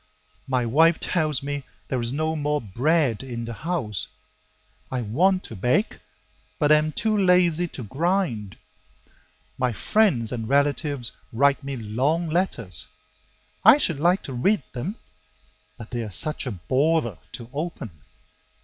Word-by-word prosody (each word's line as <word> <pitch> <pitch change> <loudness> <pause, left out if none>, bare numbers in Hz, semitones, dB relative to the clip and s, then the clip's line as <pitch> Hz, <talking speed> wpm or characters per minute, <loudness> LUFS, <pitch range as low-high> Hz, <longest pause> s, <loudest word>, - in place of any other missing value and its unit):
My 130 -2 0
wife 160 +8 +4
tells 155 -5 0
me 145 0 -3 0.3
there 130 -2 -1
is 115 0 0
no 155 +3 -1
more 150 -1 0
bread 130 - +1
in 120 -3 -5
the 115 - -5
house; 130 - -3 0.8
I 130 -1 -1
want 185 - +2
to 115 - -9
bake, 125 - 0 0.6
but 150 - +2
am 155 0 +4
too 215 +6 0
lazy 180 -3 +3
to 135 - -8
grind. 135 - -1 1.0
My 125 -1 +1
friends 130 - +2
and 115 -3 -4
relatives 140 -2 +1 0.2
write 140 +4 +2
me 140 -1 -4
long 130 +10 0
letters; 125 - 0 0.8
I - - +9
should 170 - +1
like 175 +5 +2
to 135 - -6
read 145 - +1
them, 155 - -4 0.8
but 115 - -10
they're 120 -3 -3
such 145 - +2
a - - -2
bother 130 - 0
to 115 - -7
open. 150 - -4
140 Hz, 140 wpm, -24 LUFS, 120-165 Hz, 1.0 s, I